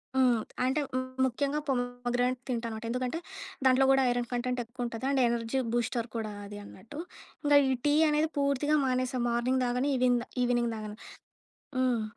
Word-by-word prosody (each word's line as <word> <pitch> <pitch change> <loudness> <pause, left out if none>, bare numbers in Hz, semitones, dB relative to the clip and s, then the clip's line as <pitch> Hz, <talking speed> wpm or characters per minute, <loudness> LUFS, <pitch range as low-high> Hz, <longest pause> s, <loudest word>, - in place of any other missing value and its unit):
హ్మ్. 250 -3 +4 0.2
అంటే 270 +4 +1
ము - - +2 0.3
ముఖ్యంగా 280 +4 0
పోమోగ్రానెట్ 245 -1 0
తింటాననమాట. 230 -2 -3
ఎందుకంటే, 250 +6 -2 0.5
దాంట్లో 260 +1 +5
కూడా 270 0 +5
ఐరన్ 245 0 0
కంటెంట్ 250 +1 -1
ఎక్కువ 240 +2 -5
ఉంటది. 230 +1 -5
అండ్ 270 -2 +2
ఎనర్జీ 235 +2 0
బూస్టర్ 240 0 0
కూడా 220 -2 -2
అది 205 0 -8
అన్నట్టు. 220 +8 -11 0.4
ఇంకా 290 0 +6
ఈ - - +2
టీ 290 - +4 0.2
అనేది 300 +1 +2
పూర్తిగా 280 +1 +2
మానేసా. 255 0 0
మార్నింగ్ 250 +2 +1
తాగను. 250 +3 0
ఈవెన్ 250 -1 +3 0.3
ఈవినింగ్ 240 -1 +1
తాగను. 215 -1 -6 0.8
హ్మ్. 250 -3 +2
250 Hz, 155 wpm, -30 LUFS, 235-265 Hz, 0.8 s, ఇంకా